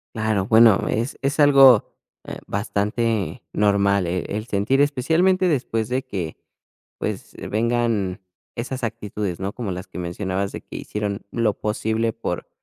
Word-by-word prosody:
Claro. 110 -3 0
Bueno, 110 -2 +6
es 115 +5 -2
es 140 +2 0
algo, 135 -5 +7 0.4
eh, - - -7
bastante 105 -2 -1
normal, 100 -2 +2
eh, 90 +1 -2
el 105 +2 -4
sentir 120 +7 +2
especialmente 165 +7 +2
después 115 -6 -1
de 130 +1 -1
que, 95 -11 -5 0.6
pues, - - -4 0.2
vengan 110 -4 0 0.3
esas 125 +1 -4
actitudes, 105 -4 -4
¿no?, 95 +1 -3
como 115 -6 -5
las 90 0 -5
que - - -10
mencionabas, 95 +2 -2
de - - -7
que - - -9
hicieron 105 -1 -4
lo 115 -3 +1
posible 110 +1 -1
por 90 -6 -4
110 Hz, 145 wpm, -22 LUFS, 100-120 Hz, 0.6 s, algo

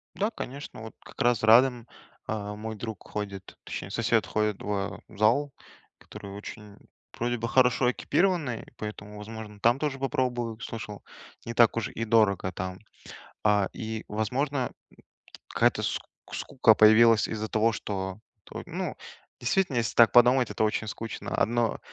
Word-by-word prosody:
Да, 205 +5 0
конечно, 140 - -7
вот 110 0 -9
как - - -9
раз 120 -2 +2
Радем, 120 +1 +5 0.4
э, 105 -1 -3
мой 110 +1 -6
друг, 110 -2 -7
ходит, 100 -2 -6
точнее 95 - -6
сосед, 115 0 +1
ходит, 105 -2 0
а, 100 0 -3
в 110 - -15
зал, 125 +7 +2 0.5
который 100 - -10
очень, 105 +1 -9 0.4
вроде 120 +1 -1
бы, 115 0 -3
хорошо 125 0 +3
экипированный, 155 -5 0
поэтому, 105 -1 -7
возможно, 105 0 -9
там 120 +4 +4
тоже 145 -3 -2
попробую, 120 -4 -1
слышал, 110 -3 -7 0.4
не 115 - -4
так 115 -1 +5
уж 115 - -1
и 115 - -4
дорого 105 -5 +3
там. 95 +1 -5 0.6
А, 105 -2 +3
и, 110 -1 -5
возможно, 130 +7 -1
м, - - -19 0.8
какая-то - - +2
ск - - -1 0.3
скука 125 -5 +3
появилась 110 +1 +6
из-за 110 0 -3
того, 110 +1 +2
что, 95 -2 -4 0.3
т - - -7
ну, - - -4 0.4
действительно, 135 +3 +1
если 120 -1 -1
так 120 -1 +7
подумать- 125 +1 +5
это - - 0
очень 110 0 0
скучно. 115 +1 -6
Одно 120 0 +1
110 Hz, 150 wpm, -27 LUFS, 105-120 Hz, 0.8 s, так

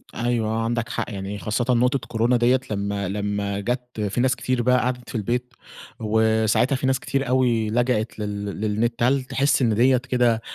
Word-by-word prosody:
أيوه 120 -2 0
آه 110 +1 -1
عندك 115 0 -1
حق - - -3
يعني، 100 0 -5
خاصةً 110 +4 -1
نقطة 125 +3 +2
كورونا 115 +2 +2
دِيَّة 125 +2 +3
لمّا 100 -1 -2
لمّا 100 0 -2
جات 125 +4 -3 0.2
في 110 +5 -1
ناس 130 +1 +2
كتير 130 -1 -1
بقى 125 +1 +4
قعدت 125 -1 -3
في - - -8
البيت، 120 +3 -2 0.5
وساعتها 110 +3 +2
في 130 0 -1
ناس 130 0 +2
كتير 135 0 -2
أوي 120 -4 +2
لجأت 115 -1 0
لل 105 -1 -4 0.2
للنت. 110 +3 0
هل 130 +2 +2
تحس 135 +2 +1
إن 115 -4 +2
دِيَّة 130 +4 +4
كده 125 -2 +1
120 Hz, 180 wpm, -23 LUFS, 110-125 Hz, 0.5 s, بقى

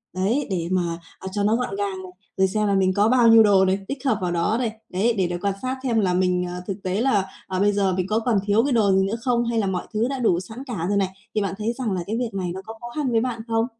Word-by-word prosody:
Đấy, 220 +10 0
để 170 -3 -2
mà, 175 -2 0 0.2
ờ, 190 - -7
cho 205 0 -1
nó 215 +2 +3
gọn 240 -5 -2
gàng 195 -2 -3
này, 185 - -10 0.3
rồi 190 - +4
xem 210 +2 0
là 200 - +2
mình 185 -1 +2
có 205 +3 +3
bao 245 -1 +5
nhiêu 225 -1 +8
đồ 195 -2 +5
này, 190 +1 +1
tích 275 0 -6
hợp 230 -6 +2
vào 180 -1 -1
đó 175 +6 +1
này. 240 -3 0 0.2
Đấy, 210 +6 +1
để 185 - +2
đó 175 - -3
quan 200 -1 0
sát 255 0 -2
xem 235 -4 +1
là 185 -3 +1
mình, 180 0 +1
ờ, 180 0 -6
thực 195 0 -5
tế 185 +3 -1
là, 215 -7 +2 0.2
ờ, 185 -1 -2
bây 205 +1 +4
giờ 195 -2 +1
mình 185 0 -1
có 215 +2 +1
còn 225 -3 +1
thiếu 210 +2 +3
cái 280 - 0
đồ 210 -4 +3
gì 190 0 +3
nữa 210 - -2
không 240 -1 +1
hay 235 -1 0
là 200 - 0
mọi 180 -2 -3
thứ 220 +3 +1
đã 270 0 -3
đủ 200 -8 +2
sẵn 220 +8 -8
cả 190 -9 -3
rồi 200 - +1
này, 195 -2 +1 0.3
thì 215 - +2
bạn 200 - -2
thấy 220 +3 -1
rằng 240 -4 -3
là 185 -2 -1
cái 220 +3 -2
việc 240 -2 -2
này 185 -3 -2
nó 190 - -6
có 225 - -7
khó 240 - -7
khăn 290 -5 -1
với 225 - +3
bạn 240 -2 -3
không? 225 0 +1
205 Hz, 315 wpm, -23 LUFS, 190-230 Hz, 0.3 s, nhiêu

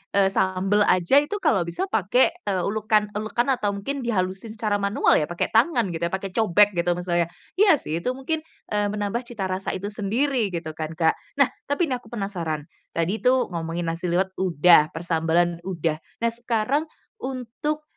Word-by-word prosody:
eee, 195 -1 +4
sambel 190 +2 +1
aja 185 +11 +5
itu 295 +8 -3
kalau 240 - +3
bisa 170 - -3
pakai, 220 - +3 0.2
eee, 190 -3 0
ulekan-ulekan 215 +3 0
atau 210 -6 0
mungkin 275 +8 -4
dihalusin 210 -2 -2
secara 210 -2 0
manual 200 +1 +3
ya 150 - -1
pakai 175 - -2
tangan 235 +3 +3
gitu 170 +1 -1
ya, - - -8
pakai 190 0 -3
cobek 210 -1 +4
gitu 175 -1 -2
maksudnya 175 -1 0 0.3
iya 405 -6 +7
sih 165 - -4
itu 250 +8 -2
mungkin, 310 +4 -2 0.3
eee, 205 0 +1
menambah 210 +4 -2
cita 220 -5 -5
rasa 185 +1 -2
itu 200 +3 -4
sendiri 230 +4 0
gitu 160 -2 -4
kan 160 0 -6
Kak. 160 0 +2 0.2
Nah, 280 -2 +3 0.2
tapi 285 +1 0
ini 250 - 0
aku - - -20
penasaran 180 -9 -3 0.3
tadi 175 +6 0
tuh 250 -5 +2
ngomongin 165 0 -3
nasi 170 +2 -4
liwet 185 +2 +1
udah, 170 -3 +5
persambalan 170 +1 +1
udah, 165 -4 -1 0.2
nah 230 - +3
sekarang 240 +6 -1 0.3
untuk, 270 - -4
200 Hz, 175 wpm, -24 LUFS, 175-240 Hz, 0.3 s, iya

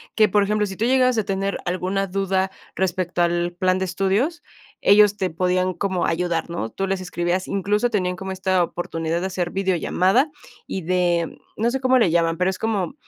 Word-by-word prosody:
Que, 215 -1 +4
por 205 +1 +3
ejemplo, 210 +1 +1
si 190 - -7
tú 225 - 0
llegabas 255 -1 +3
a 220 - +2
tener 195 0 -1
alguna 185 +2 -1
duda 190 0 0 0.3
respecto 180 -1 -1
al 175 0 +1
plan 185 0 +2
de 190 - 0
estudios, 195 - 0 0.4
ellos 205 0 +5
te 190 -2 -1
podían 185 +2 0
como 190 -1 -1
ayudar, 170 0 -1
¿no? 170 -10 -3
Tú 195 - -3
les 190 -1 -1
escribías, 180 0 -2
incluso 205 +4 0
tenían 185 -5 -1
como 190 +1 -6
esta 185 -1 +1
oportunidad 165 -1 -3
de 185 - -2
hacer 180 -2 -2
videollamada 190 - +1 0.4
y 190 - -4
de, 175 -1 0 0.2
no 230 +2 +1
sé 265 +1 -2
cómo 260 0 +4
le 225 -8 +4
llaman, 165 -1 +2
pero, 180 +1 +2
es 185 - -8
como 210 -4 -1
190 Hz, 195 wpm, -22 LUFS, 175-200 Hz, 0.4 s, ellos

